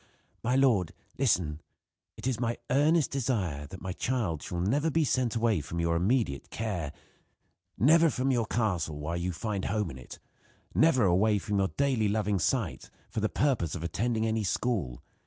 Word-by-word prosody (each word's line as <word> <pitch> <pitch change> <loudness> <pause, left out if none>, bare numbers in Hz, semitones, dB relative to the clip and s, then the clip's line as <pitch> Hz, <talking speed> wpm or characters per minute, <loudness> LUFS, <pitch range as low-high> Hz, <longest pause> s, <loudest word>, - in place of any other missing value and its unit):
"My 125 +2 +1
lord 120 - +3 0.3
listen: 90 - +1 0.6
It - - -8
is 130 -3 0
my 120 -1 -1
earnest 150 +3 +3
desire 100 - -1
that 95 +5 -10
my 95 -1 -3
child 105 - -1
shall 90 - -5
never 140 - +1
be 160 +1 +2
sent 125 -4 0
away 115 -6 +2
from 80 +4 -5
your 85 0 +1
immediate 95 - 0
care 90 -10 -3 0.9
never 160 +6 +5
from 135 -1 0
your 120 -4 +1
castle 90 -10 -1
while 80 +3 -3
you 90 +1 -2
find 100 +2 -3
home 105 -5 -1
in 65 - -10
it 65 - -10 0.6
never 145 -7 +4
away 100 +4 +3
from 100 +1 -1
your 95 - +2
daily 130 -6 +2
loving 105 -2 0
sight 115 -1 -1 0.2
for - - -2
the 110 0 0
purpose 125 - 0
of 85 - -5
attending 110 +7 -1
any 110 -1 0
school. 95 - -1
110 Hz, 175 wpm, -29 LUFS, 85-125 Hz, 0.9 s, never